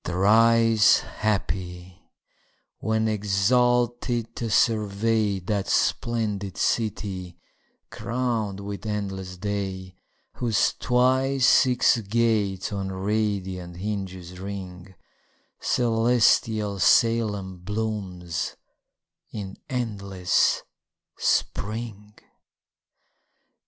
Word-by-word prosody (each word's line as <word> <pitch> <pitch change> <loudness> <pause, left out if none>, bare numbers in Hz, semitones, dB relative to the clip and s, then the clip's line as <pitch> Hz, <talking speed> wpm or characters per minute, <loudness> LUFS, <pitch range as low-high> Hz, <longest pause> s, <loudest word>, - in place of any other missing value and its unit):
Thrice 110 +4 +4
happy, 90 -3 -4 0.7
when 110 0 0
exalted 120 +3 +1
to 115 - -3
survey 105 -1 +1
That 95 +1 -2
splendid 105 -5 -1
city, 95 -5 -2 0.5
crown'd 115 -5 -2
with 100 +2 -6
endless 95 -3 -4
day, 95 -2 -4 0.4
Whose 115 -4 +1
twice 130 +2 +2
six 125 -2 +4
gates 105 -2 0
on 95 -1 -3
radiant 95 -3 -2
hinges 95 -3 -5
ring: 95 -1 -8 0.6
Celestial 115 -3 +2
Salem 105 -3 +2
blooms 95 -5 -4 0.8
in 100 -3 -6
endless 100 -7 0 0.6
spring. 105 -1 -2
105 Hz, 70 wpm, -25 LUFS, 95-115 Hz, 0.8 s, Thrice